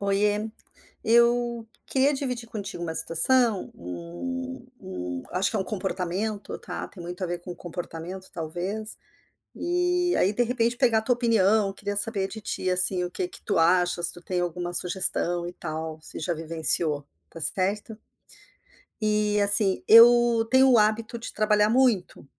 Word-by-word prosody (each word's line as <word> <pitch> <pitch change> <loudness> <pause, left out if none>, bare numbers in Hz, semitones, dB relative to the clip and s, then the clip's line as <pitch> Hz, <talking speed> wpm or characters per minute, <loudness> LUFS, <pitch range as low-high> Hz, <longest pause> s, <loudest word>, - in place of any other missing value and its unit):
Oiê. 205 +2 0 0.5
Eu 235 0 +2 0.2
queria 275 +2 +2
dividir 250 -4 -4
contigo 205 -5 -7
uma 165 -1 -4
situação, 210 +7 +2
um 255 - -7
um 90 - -6
acho 185 +1 0
que 225 - -3
é - - 0
um 190 - -2
comportamento, 195 +1 -4
tá? - - -7
Tem 180 - -12
muito 175 +2 -8
a - - -2
ver 175 0 -4
com 175 0 -8
comportamento, 175 +2 -8
talvez. 180 +7 -5 0.6
Eh, 355 0 0
aí, 195 - +2
de 245 - 0
repente, 240 0 0
pegar 240 -4 +2
a - - -2
tua 245 +3 +1
opinião. 220 -4 +2
Queria 205 +1 -5
saber 205 -2 +2
de 220 - -8
ti, 185 -2 -2
assim, 180 0 +4
o 175 - -5
que 360 - -4
que 385 - -10
tu - - -1
achas, 175 +1 +3
se - - +3
tu 175 - -11
tem 180 0 -3
alguma 175 0 -4
sugestão 175 -1 +1
e - - -8
tal, 160 -2 -6
se - - -7
já 170 +2 -2
vivenciou. 160 -2 -1 0.2
Está 165 - -13
certo? 205 +5 0 1.0
E 210 -1 +1
assim, 200 -1 +5
eu 235 0 +6
tenho 265 +1 +5
o 240 - +5
hábito 220 +2 0
de - - -7
trabalhar 210 -1 +2
muito, 235 - +1
205 Hz, 165 wpm, -25 LUFS, 175-230 Hz, 1.0 s, eu